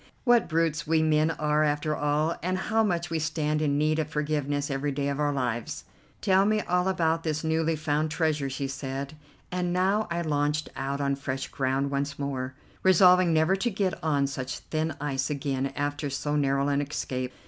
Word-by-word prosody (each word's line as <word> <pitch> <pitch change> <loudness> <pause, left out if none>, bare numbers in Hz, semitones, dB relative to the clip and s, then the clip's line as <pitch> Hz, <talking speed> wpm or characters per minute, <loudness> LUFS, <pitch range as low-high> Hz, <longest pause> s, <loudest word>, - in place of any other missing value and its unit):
What 240 -6 +4
brutes 160 -2 0
we 160 0 +3
men 155 0 +3
are 150 -1 +1
after 150 0 0
all, 150 +3 +1
and 185 +2 -1
how 220 +4 +1
much 175 -4 -1
we 165 - 0
stand 155 -1 -1
in 145 -2 +1
need 155 +1 +2
of 155 - 0
forgiveness 145 -1 -1
every 140 +1 -1
day 140 0 -1
of 140 0 -3
our 145 -1 +2
lives! 120 -4 -2 0.4
"Tell 190 0 +4
me 215 +1 +2
all 180 0 +1
about 165 -3 +1
this 155 -1 -2
newly 160 0 +1
found 155 0 0
treasure," 155 -3 0
she 135 +1 -3
said, 135 +1 -5 0.4
and 180 -1 -1
now 190 +4 +1
I 170 0 -1
launched 150 -1 0
out 140 +1 -3
on 140 0 +1
fresh 135 -1 -4
ground 135 +1 -1
once 140 0 -2
more, 135 -2 -3 0.3
resolving 180 -1 +6
never 160 +4 +3
to 215 +5 0
get 195 -3 0
on 145 -3 +2
such 135 -1 -4
thin 155 -1 -3
ice 135 -2 -1
again 135 -2 -1
after 145 0 -2
so 145 +2 -2
narrow 140 -1 +1
an 140 0 +1
escape. 130 -3 -3
150 Hz, 190 wpm, -27 LUFS, 140-165 Hz, 0.4 s, resolving